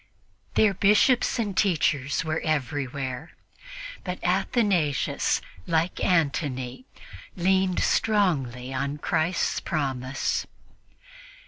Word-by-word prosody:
Their 210 -2 +4
Bishops 210 +8 +3
and 210 -5 -2
teachers 145 -7 +1
were 160 0 -1
everywhere; 140 -1 -3 0.7
but 180 -1 -4
Athanasius, 185 - +1 0.3
like 165 +2 0
Antony, 145 - 0 0.5
leaned 185 0 +2
strongly 135 - +1
on 140 +2 -2
Christ's 160 +4 0
promise. 135 -3 -2
160 Hz, 80 wpm, -26 LUFS, 135-190 Hz, 0.7 s, Their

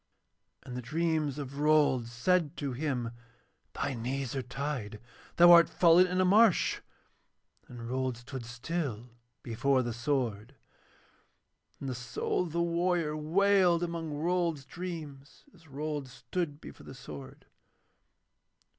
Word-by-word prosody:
And 125 - -8
the 125 - -4
dreams 155 +1 -1
of 140 -1 -6
Rold 145 -5 +3
said 150 +7 0
to 140 -2 -3
him: 125 -4 -2 0.6
'Thy 140 - -2
knees 130 +2 -3
are 135 - -1
tied, 125 -5 -5 0.4
thou 175 0 +8
art 170 -2 +8
fallen 175 +1 +5
in 180 +1 -1
a 185 - +4
marsh,' 210 +1 +4 0.9
and 120 -2 -9
Rold 130 0 -2
stood 125 +1 -8
still 125 -1 -4 0.3
before 130 +3 +1
the 120 -1 -3
sword. 120 -2 -2 1.2
Then - - -7
the 130 - -2
soul 120 +5 -2
of 165 - -7
the 170 +2 0
warrior 170 -2 0
wailed 175 +2 +3
among 165 -2 -4
Rold's 165 -1 -1
dreams, 155 -6 -8
as 165 -2 -20
Rold 145 0 -4
stood 145 +3 -4
before - - -12
the - - -9
sword. 70 -3 -10
145 Hz, 130 wpm, -30 LUFS, 125-170 Hz, 1.2 s, thou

